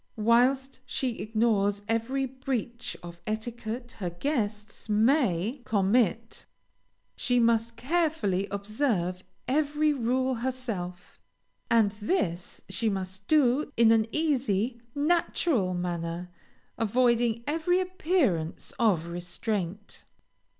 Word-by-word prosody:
Whilst 255 +4 +3
she 255 -1 -2
ignores 210 -2 +1
every 230 +4 0
breach 260 -3 -4
of 170 0 -10
etiquette 230 +2 -4
her 180 -3 -2
guests 210 - -3
may 225 - +2
commit, 225 +1 +1 0.7
she 245 -1 +1
must 230 0 +2
carefully 255 - 0
observe 200 -3 -1 0.2
every 295 +2 +2
rule 260 0 +1
herself, 230 -8 -4 0.5
and 225 -3 +4
this 205 - -2
she 220 +3 -1
must 190 0 -5
do 285 -1 +3
in 230 -1 +6
an 225 -1 +4
easy, 250 -7 0
natural 290 - +1
manner, 175 0 -3 0.5
avoiding 235 0 +2
every 330 +4 +1
appearance 320 - 0
of 200 -9 +3
restraint. 180 +3 -4
230 Hz, 95 wpm, -28 LUFS, 200-260 Hz, 0.7 s, in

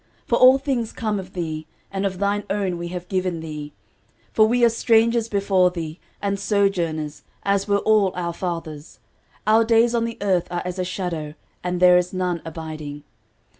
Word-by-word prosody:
for - - +1
all 255 +1 +8
things 255 -5 -2
come 215 -2 -2
of 185 0 -9
thee, 155 -3 -4 0.2
and 195 0 0
of 190 -1 -5
thine 200 +1 0
own 195 -2 0 0.2
have 175 0 -5
we - - -31
given 185 -3 -1
thee. 150 -2 -6 0.6
13:029:015 - - -37
For 215 0 +5
we 240 +1 +4
are - - +6
strangers 230 0 +2
before 195 -3 +3
thee, 165 -2 -6 0.2
and 200 -1 -1
sojourners, 175 -8 0 0.2
as 200 0 +1
were 200 0 +3
all 205 -2 +3
our 170 -1 -2
fathers: 165 -4 -5 0.5
our 220 +2 +5
days 230 +1 +4
on 230 -1 +1
the 230 0 -5
earth 185 -4 +1
are 175 - -3
as 180 +1 -4
a - - +1
shadow, 175 -5 -4 0.3
and 180 0 -2
there 180 0 +7
is 180 +1 -3
none 180 -2 -1
abiding. 155 -3 -7
185 Hz, 185 wpm, -23 LUFS, 170-210 Hz, 0.6 s, all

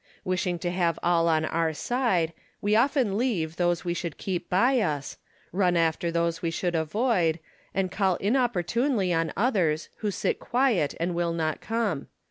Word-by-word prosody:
Wishing 185 -1 -1
to 175 +1 -2
have 175 -2 +1
all 170 -1 +3
on 155 -1 +2
our 160 0 0
side, 190 - 0 0.3
we 205 +1 +1
often 235 -4 +2
leave 175 -10 -1
those 175 0 +1
we 175 - 0
should 170 -2 -4
keep 180 -3 -3
by 245 +8 +3
us, 150 - -2 0.3
run 180 -1 +2
after 165 +1 +1
those 170 0 0
we 170 - 0
should 175 +1 -2
avoid, 170 0 +1 0.3
and 190 -2 -1
call 190 -3 +1
importunately 230 - +1
on 165 -1 0
others 180 -9 +1
who 210 - -2
sit 200 - -1
quiet 240 - +1
and 175 +2 -1
will 170 0 0
not 160 -2 -2
come. 220 -10 -1
175 Hz, 165 wpm, -27 LUFS, 165-215 Hz, 0.3 s, all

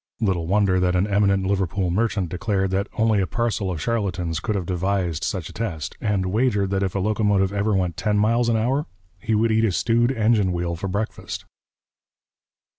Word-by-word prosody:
Little 95 -7 0
wonder 100 -1 +2
that 90 0 +1
an 90 +2 +2
eminent 100 -2 +2
Liverpool 95 -2 0
merchant 100 -2 0
declared 95 +2 -1
that 100 +2 0
only 110 -2 +3
a 95 - -1
parcel 115 -5 -1
of 85 -4 -3
charlatans 90 -6 -1
could 110 - -2
have 95 -3 -2
devised 90 -2 -1
such 90 -6 -2
a - - -11
test, 90 - -4
and 100 -3 0
wagered 100 -1 +1
that 95 -1 0
if 95 -1 -1
a - - +1
locomotive 100 -1 +1
ever 100 +1 +1
went 90 -3 -1
ten 105 +2 0
miles 115 +3 +2
an 115 - +2
hour, 130 +7 0 0.3
he 110 +4 -1
would 110 +1 +2
eat 110 +1 +3
a 110 - +3
stewed 120 +6 +2
engine 110 -6 +2
wheel 85 0 -2
for 90 +4 -4
breakfast! 105 +4 -4
100 Hz, 190 wpm, -23 LUFS, 95-110 Hz, 0.3 s, only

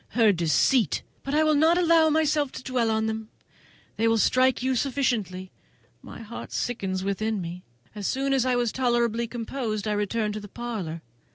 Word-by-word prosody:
her 225 -3 +6
deceit! 175 - +2 0.2
but 275 +2 -3
I 310 - +4
will 310 0 +3
not 320 +4 +4
allow 335 -2 +4
myself 305 -2 +1
to - - -8
dwell 250 -3 0
on 220 0 +1
them; 220 0 -4 0.7
they 225 +2 +2
will 225 0 +3
strike 255 +3 +3
you 260 0 +1
sufficiently. 230 -9 -1 0.5
My - - -10
heart 230 +2 -8
sickens 190 -6 -2
within 210 +2 -1
me. 175 0 -6 0.3
As 205 -2 -4
soon 275 +1 0
as 265 -3 +2
I 255 -1 +1
was 240 -2 +1
tolerably 235 -2 0
composed 230 -2 -4
I - - 0
returned 210 +1 -1
to 215 - -4
the 205 - -9
parlour. 200 -8 -5
230 Hz, 180 wpm, -26 LUFS, 210-260 Hz, 0.7 s, her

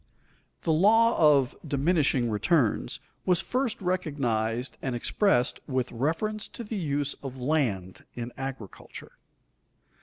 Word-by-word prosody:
_The 160 - +2
law 225 +7 +5
of 145 -5 +4
"diminishing 140 -5 +1
returns" 115 - +1 0.2
was 180 -2 +3
first 255 -3 -1
recognized 135 - -1
and 130 -2 -2
expressed 130 - +1
with 130 -3 -1
reference 165 - -1
to 235 - -8
the 220 0 -5
use 145 -3 0
of 135 -2 -7
land 125 - -1
in 120 0 -5
agriculture. 135 -7 -8
140 Hz, 115 wpm, -27 LUFS, 125-180 Hz, 0.2 s, law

